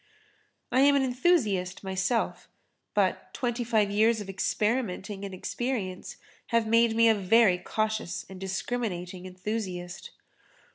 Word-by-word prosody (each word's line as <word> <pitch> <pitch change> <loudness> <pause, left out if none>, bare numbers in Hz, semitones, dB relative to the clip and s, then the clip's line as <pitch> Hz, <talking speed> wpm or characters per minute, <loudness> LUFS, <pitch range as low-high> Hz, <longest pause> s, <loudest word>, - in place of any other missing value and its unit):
I 255 - +3
am 285 +1 +6
an 275 - +3
enthusiast 245 - +1
myself, 190 +5 -1 0.5
but - - +1
twenty 240 -1 -1
five 220 -3 +2
years 220 +2 +3
of 200 -2 -6
experimenting 205 -1 -1
and 200 - -5
experience 190 -1 -4 0.3
have 230 -1 +2
made 230 0 +3
me 230 0 +5
a 215 -2 +4
cautious 215 -4 -2
and 190 -1 -10
discriminating 190 -3 -3
enthusiast. 185 -2 -5
215 Hz, 115 wpm, -28 LUFS, 190-235 Hz, 0.5 s, am